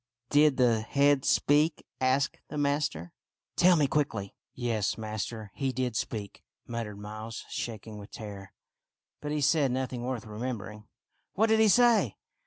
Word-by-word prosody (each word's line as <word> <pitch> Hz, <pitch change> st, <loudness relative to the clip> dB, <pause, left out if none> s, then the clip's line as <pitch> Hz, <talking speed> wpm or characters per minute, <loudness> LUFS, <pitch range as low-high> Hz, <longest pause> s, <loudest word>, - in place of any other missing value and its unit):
" -, -, -64 dB
Did 150 Hz, -1 st, +5 dB
the 120 Hz, -3 st, +3 dB
head 140 Hz, +3 st, +3 dB
speak? 150 Hz, +2 st, +3 dB
" -, -, -36 dB
asked 130 Hz, +2 st, +1 dB
the -, -, -6 dB
master. 140 Hz, -, 0 dB, 0.2 s
" -, -, -64 dB
Tell 180 Hz, 0 st, +6 dB
me 150 Hz, -3 st, +3 dB
quickly." 125 Hz, -9 st, -1 dB, 0.2 s
" -, -, -62 dB
Yes, 115 Hz, -5 st, -1 dB
master, 110 Hz, -1 st, -5 dB
he 135 Hz, -1 st, -1 dB
did 125 Hz, -2 st, -2 dB
speak," 105 Hz, -2 st, -4 dB, 0.2 s
muttered 115 Hz, -3 st, -5 dB
Miles, 110 Hz, +2 st, -7 dB
shaking 110 Hz, -2 st, -5 dB
with 100 Hz, -, -10 dB
terror. 100 Hz, -3 st, -8 dB, 0.4 s
" -, -, -61 dB
But 150 Hz, -, -4 dB
he 150 Hz, 0 st, -1 dB
said 140 Hz, -2 st, +3 dB
nothing 130 Hz, -1 st, -2 dB
worth 125 Hz, -2 st, -3 dB
remembering." 105 Hz, -1 st, -6 dB, 0.2 s
" -, -, -47 dB
What 220 Hz, +4 st, +3 dB
did 220 Hz, 0 st, +4 dB
he 220 Hz, -, +6 dB
say 225 Hz, -, +4 dB
125 Hz, 175 wpm, -29 LUFS, 110-145 Hz, 0.4 s, Tell